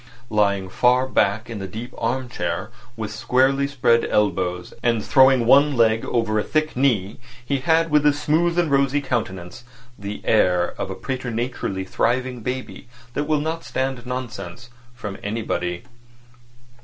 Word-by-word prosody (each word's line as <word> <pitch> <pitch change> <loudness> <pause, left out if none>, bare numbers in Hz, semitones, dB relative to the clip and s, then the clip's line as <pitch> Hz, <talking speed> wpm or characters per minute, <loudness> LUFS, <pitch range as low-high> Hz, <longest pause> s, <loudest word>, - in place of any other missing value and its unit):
Lying 100 -3 +1
far 125 +6 +3
back 110 -4 +1
in 115 -3 -6
the 95 - -5
deep 115 +6 -8
arm 125 +3 -2
chair, 120 -2 -3 0.3
with 110 -1 -4
squarely 135 +5 +2
spread 120 -4 +2
elbows, 90 -3 0
and 115 -3 +1
throwing 130 -2 +5
one 140 +3 +5
leg 110 -1 +3
over 115 -2 0
a - - 0
thick 155 0 -1
knee, 115 -7 +1 0.3
he 140 +2 0
had 160 +3 +2
with 150 -1 +4
his 145 0 +3
smooth 165 +3 +1
and 170 -4 +2
rosy 140 +1 +3
countenance 115 -6 -4 0.4
the 100 +1 -6
air 90 -5 +2
of - - -3
a - - -4
preternaturally 120 -6 -3
thriving 125 +5 -1
baby 125 +1 -5 0.3
that 145 - -1
will 150 -1 +1
not 160 +2 -3
stand 130 -2 -3
nonsense 120 -4 -6 0.2
from 105 -5 -7
anybody. 100 -4 -3
120 Hz, 150 wpm, -22 LUFS, 105-135 Hz, 0.4 s, throwing